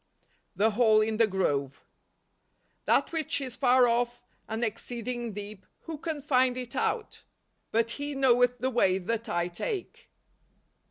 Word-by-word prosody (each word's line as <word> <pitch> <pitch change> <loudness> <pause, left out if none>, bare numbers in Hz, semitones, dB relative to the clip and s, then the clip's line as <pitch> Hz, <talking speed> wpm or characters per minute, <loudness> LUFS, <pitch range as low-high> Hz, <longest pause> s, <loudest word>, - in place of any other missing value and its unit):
The 220 +2 +3
Ttall 215 -1 +4
in 220 -1 -2
the 225 -1 +4
Grove. 140 -9 -1 0.5
" - - -44
That - - +2
which 320 -4 -1
is 255 -3 -5
far 250 -1 +4
off, 240 +1 0 0.2
and 220 +2 -3
exceeding 235 +1 -4
deep, 205 -1 -8 0.2
who 320 -3 -7
can 310 -3 -4
find 255 -3 +2
it 250 -2 -6
out 445 -3 -2 0.2
?" - - -48
" - - -47
But 230 +1 +1
He 285 +2 -4
knoweth 250 -2 +3
the 260 +1 -1
way 190 -6 +3
that 230 +5 -3
I 175 0 0
take." 370 - -5
240 Hz, 160 wpm, -28 LUFS, 215-260 Hz, 0.5 s, Ttall